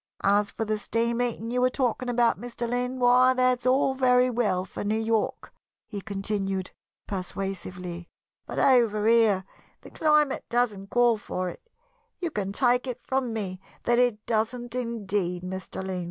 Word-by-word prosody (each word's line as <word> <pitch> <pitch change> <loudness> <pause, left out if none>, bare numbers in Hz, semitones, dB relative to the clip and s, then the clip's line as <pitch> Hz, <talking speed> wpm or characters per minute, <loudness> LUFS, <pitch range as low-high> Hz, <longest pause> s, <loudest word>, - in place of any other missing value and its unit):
As 200 +1 +3
for 225 - -4
the 215 0 -1
steam 230 +2 -1
heating 235 -2 -2
you 250 0 +1
were 255 - +4
talking 250 -1 -1
about, 235 -3 +2
Mr. 240 0 -4
Lynn, 250 +2 -1
why, 250 +1 +5
that's 255 -1 +2
all 265 +1 +3
very 250 -1 +3
well 205 -6 0
for 190 - -6
New 210 +2 0
York," 225 -1 -1 0.3
he 205 -3 -6
continued, 195 -2 -2 0.3
persuasively, 180 -2 -5 0.4
"but - - -6
over 230 -5 +4
here 220 -4 +4 0.4
the - - -13
climate 300 -3 +2
doesn't 215 -5 0
call 240 -2 +3
for 185 -3 -3
it - - -10 0.6
you 345 -3 -2
can 195 -6 -2
take 245 +3 +2
it 250 -1 -4
from 260 -2 -1
me 195 -4 -4 0.2
that 240 0 +3
it 240 -4 +1
doesn't, 235 +2 -1
indeed, 205 -7 -2
Mr. 190 +1 -6
Lynn. 190 -1 -3
230 Hz, 160 wpm, -26 LUFS, 195-245 Hz, 0.6 s, why